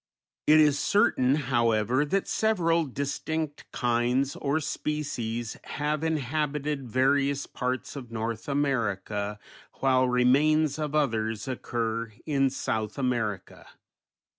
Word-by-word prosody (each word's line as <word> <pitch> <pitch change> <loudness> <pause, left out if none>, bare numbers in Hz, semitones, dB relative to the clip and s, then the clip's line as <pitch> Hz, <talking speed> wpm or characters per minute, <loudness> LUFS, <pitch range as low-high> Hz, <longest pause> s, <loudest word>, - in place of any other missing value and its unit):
It 155 +1 +7
is 150 -2 +4
certain, 135 -10 +3
however, 120 -2 +1
that 195 +6 0
several 170 -7 +2
distinct 145 +3 -4
kinds, 125 +3 +1
or 140 +2 0
species, 135 -7 -3 0.2
have 150 +2 -1
inhabited 150 -2 -1
various 140 +3 +2
parts 125 +2 -3
of 130 -4 -7
North 115 +2 -4
America, 110 -7 -1 0.4
while 130 -1 +2
remains 140 +5 +3
of 150 -1 -2
others 110 -5 0
occur 115 -3 -3
in 135 -3 +2
South 110 -5 -3
America. 120 -7 -2
135 Hz, 105 wpm, -27 LUFS, 115-150 Hz, 0.4 s, It